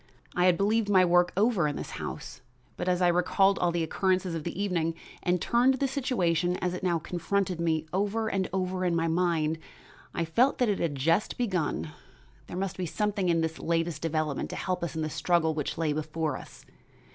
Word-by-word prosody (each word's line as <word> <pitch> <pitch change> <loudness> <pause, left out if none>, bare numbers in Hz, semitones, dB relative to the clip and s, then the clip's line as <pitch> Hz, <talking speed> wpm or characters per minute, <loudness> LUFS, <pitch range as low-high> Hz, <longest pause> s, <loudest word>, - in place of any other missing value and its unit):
I 180 - +3
had 180 -2 +5
believed 210 +2 +1
my 185 -2 +6
work 175 +1 +4
over 205 -6 +3
in 145 - -2
this - - -6
house, - - -6 0.3
but 180 - -2
as 180 0 +2
I - - +5
recalled 195 +3 +3
all 175 - +2
the 170 -1 0
occurrences 185 +1 0
of 165 -2 -3
the 170 +3 -5
evening 170 -5 0 0.3
and 180 0 +1
turned 245 +7 +3
the 275 +1 0
situation, 180 - 0
as 180 -1 -1
it 180 - -5
now 175 -3 +1
confronted 180 +2 -1
me, 160 -2 +1
over 205 +4 0
and 195 -3 -1
over 185 0 -1
in 175 -2 +1
my 165 0 +1
mind, 165 -2 +1 0.5
I 170 - -1
felt 240 +12 +3
that 245 -3 +2
it 200 - 0
had 155 -4 -1
just 165 +9 +1
begun. 170 - -1 0.6
There 175 - -6
must 195 0 -3
be 185 -2 -2
something 205 0 0
in 165 -1 +3
this 160 0 -2
latest 165 -2 -1
development 155 -3 -1
to - - -5
help 185 -2 -2
us 170 -1 -3
in 160 - -1
the 155 - -2
struggle 170 -1 +2
which 150 -2 -3
lay 160 -2 +1
before 155 -1 -2
us. - - -11
175 Hz, 205 wpm, -28 LUFS, 165-195 Hz, 0.6 s, my